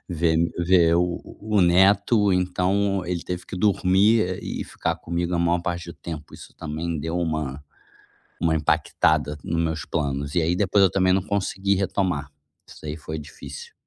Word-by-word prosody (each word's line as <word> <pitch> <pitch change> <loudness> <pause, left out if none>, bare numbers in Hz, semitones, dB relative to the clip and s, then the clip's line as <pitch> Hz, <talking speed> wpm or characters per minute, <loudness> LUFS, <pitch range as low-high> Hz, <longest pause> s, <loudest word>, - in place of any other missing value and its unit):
ver 85 -2 +1
m 85 +1 +2
ver 85 -1 +4
o 90 0 0 0.2
o 105 -1 +1
neto, 100 +4 +4
então 95 +2 +1
ele 85 -1 -2
teve 90 0 -4
que - - -7
dormir, 100 +3 +3
eh, 90 -1 -3
e - - -4
ficar - - -3
comigo 85 +1 -3
a - - +1
maior 85 +1 +2
parte 85 -1 -4
do - - -10
tempo, 80 -3 -8
isso - - -13
também 80 +1 -4
deu 80 +3 -3
uma 80 -4 -2 0.8
uma 80 -1 +2
impactada 75 -1 +1
no 85 - -2
meus 80 -1 -1
planos. 70 -2 -2
E 85 - +3
aí 85 +2 +1
depois 100 +1 +3
eu 95 - +4
também 95 0 +2
não 95 0 +2
consegui 100 0 0
retomar. 95 -6 -1 0.4
Isso - - -14
aí 75 0 -4
foi 80 0 -6
difícil. 455 - -10
85 Hz, 175 wpm, -24 LUFS, 80-95 Hz, 0.8 s, ver